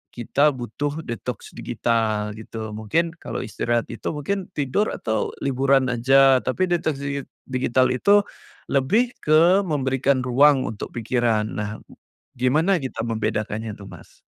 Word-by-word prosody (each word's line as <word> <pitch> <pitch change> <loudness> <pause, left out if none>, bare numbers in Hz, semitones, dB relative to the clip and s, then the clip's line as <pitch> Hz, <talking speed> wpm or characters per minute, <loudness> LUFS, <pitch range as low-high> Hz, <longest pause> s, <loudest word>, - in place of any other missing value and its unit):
kita 135 +5 +2
butuh 145 +6 -4
detoks 115 -3 -6
digital 110 -2 -1
gitu, 110 -1 -7
mungkin 110 +11 -1
kalau - - -5
istirahat 120 +2 -1
itu 115 - -7
mungkin 185 +6 -3
tidur 145 +9 0
atau 110 -1 -2
liburan 135 0 +2
aja, 135 +2 +5
tapi 185 +8 0
detoks 160 -5 0
digi 140 0 -2 0.3
digital 130 0 +1
itu, 200 +11 +4 0.5
lebih 205 - +2
ke 170 +6 +4
memberikan 135 -2 +1
ruang 135 +2 +4
untuk 110 -5 -6
pikiran. 115 -2 0
Nah, 105 0 -3 0.7
gimana 160 +9 +2
kita 130 -4 -4
membedakannya 110 -1 -2
tuh, 100 -1 -12
Mas? - - -15
130 Hz, 130 wpm, -23 LUFS, 115-145 Hz, 0.7 s, aja